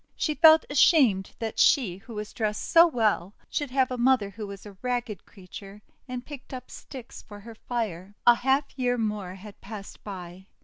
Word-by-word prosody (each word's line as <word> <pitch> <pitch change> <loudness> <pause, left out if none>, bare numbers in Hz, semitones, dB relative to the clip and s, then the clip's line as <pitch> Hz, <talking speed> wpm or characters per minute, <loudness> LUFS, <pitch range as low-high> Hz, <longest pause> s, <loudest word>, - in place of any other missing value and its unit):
She 305 - -1
felt 320 0 +7
ashamed 260 - +3
that 225 -1 -4
she, 215 - +4
who 220 +4 -12
was 210 0 -6
dressed 215 -2 -2
so 335 0 +7
well, 215 - 0 0.2
should 290 -2 -2
have 260 0 +1
a 250 - -3
mother 240 -5 +3
who 210 +1 -7
was 200 0 -10
a 205 -2 -11
ragged 245 -5 -3
creature 195 +2 -12 0.2
and 250 -1 -6
picked 275 -2 -9
up 255 - -10
sticks 255 -3 -10
for 205 -2 -12
her 230 +2 -10
fire. 205 -5 -5
A 240 - +9
half 265 +4 +1
year 245 -1 +1
more 210 -5 -3
had 200 +1 -13
passed 200 -1 -10
by. 185 -1 -9
220 Hz, 185 wpm, -26 LUFS, 200-255 Hz, 0.2 s, A